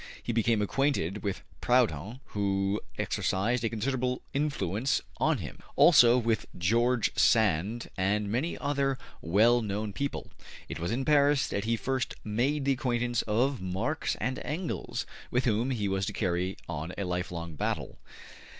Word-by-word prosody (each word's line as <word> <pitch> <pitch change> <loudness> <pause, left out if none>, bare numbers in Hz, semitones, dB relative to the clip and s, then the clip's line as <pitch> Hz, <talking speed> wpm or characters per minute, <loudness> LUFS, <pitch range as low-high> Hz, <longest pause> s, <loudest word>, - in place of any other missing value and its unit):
He 120 - -2
became 115 -1 +2
acquainted 105 - 0
with 100 -2 -3 0.2
Proudhon, 120 - +1
who 100 0 0 0.2
exercised 110 +6 0
a 115 - +1
considerable 125 +3 -1
influence 130 - 0 0.2
on - - +2
him; - - -7 0.2
also 120 0 +7
with 115 -3 0
George 115 +5 +2
Sand 110 0 +2
and 100 +2 0
many 125 +11 -1
other 140 -2 0 0.2
well 110 +9 +4
known 105 0 -3
people. 140 +6 -4 0.4
It - - -6
was 85 - -2
in 130 +3 -1
Paris 145 -2 +4
that 100 +1 -2
he 115 +1 +2
first 130 +2 -2
made 130 +7 0
the 140 - +3
acquaintance 120 -2 0
of 125 +4 +1
Marx 95 +12 -1
and 130 +1 -2
Engels, 165 +3 -3 0.2
with 125 +1 +1
whom 115 +2 +1
he 110 -6 -1
was 95 0 -1
to - - -3
carry 90 -1 -1
on 80 +1 -4
a 100 - -1
lifelong 90 -2 -3
battle. 75 - -3
115 Hz, 150 wpm, -29 LUFS, 100-130 Hz, 0.4 s, also